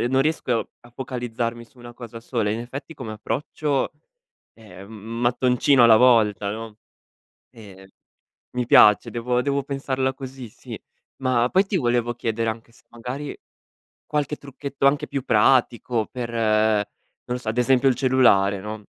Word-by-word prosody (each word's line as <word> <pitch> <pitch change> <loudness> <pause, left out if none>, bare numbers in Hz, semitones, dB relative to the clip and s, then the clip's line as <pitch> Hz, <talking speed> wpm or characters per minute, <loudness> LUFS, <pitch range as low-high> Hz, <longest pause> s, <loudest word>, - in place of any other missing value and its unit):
E 120 - 0
non 130 +1 +2
riesco 135 -6 -1
a 120 - -18
focalizzarmi 120 -2 -4
su 125 +2 -25
una 120 0 -12
cosa 120 -2 -9
sola. 115 -2 -2
In 110 - -2
effetti 130 +7 -8
come 120 -7 -8
approccio, 145 +5 -2 0.6
ehm, 100 -3 -14
m 115 +2 -7
mattoncino 125 +2 +3
alla 115 -2 +7
volta, 105 -5 +3
no, 110 0 -8 0.7
ehm, 95 -4 -14 0.7
mi 125 -1 -2
piace 105 -2 +6
devo 125 +1 -1
devo 140 +1 0
pensarla 135 -1 -2
così 130 -2 -9
sì. - - -11 0.4
Ma 125 -2 +1
poi 190 +2 +3
ti 195 - -3
volevo 120 -6 0
chiedere 115 -1 -2
anche 115 +1 -7
se - - -24
magari 125 +5 -6 0.7
qualche 150 0 -2
trucchetto 140 0 -4
anche 140 +1 +2
più 140 - -3
pratico 120 -1 +2
per, 120 -2 -6
non 110 +1 -1
lo - - -5
so 120 -3 -8
ad 115 - -5
esempio 130 +1 +3
il 125 - +1
cellulare 120 -7 +3
no, 105 +1 -7
120 Hz, 155 wpm, -23 LUFS, 110-130 Hz, 0.7 s, alla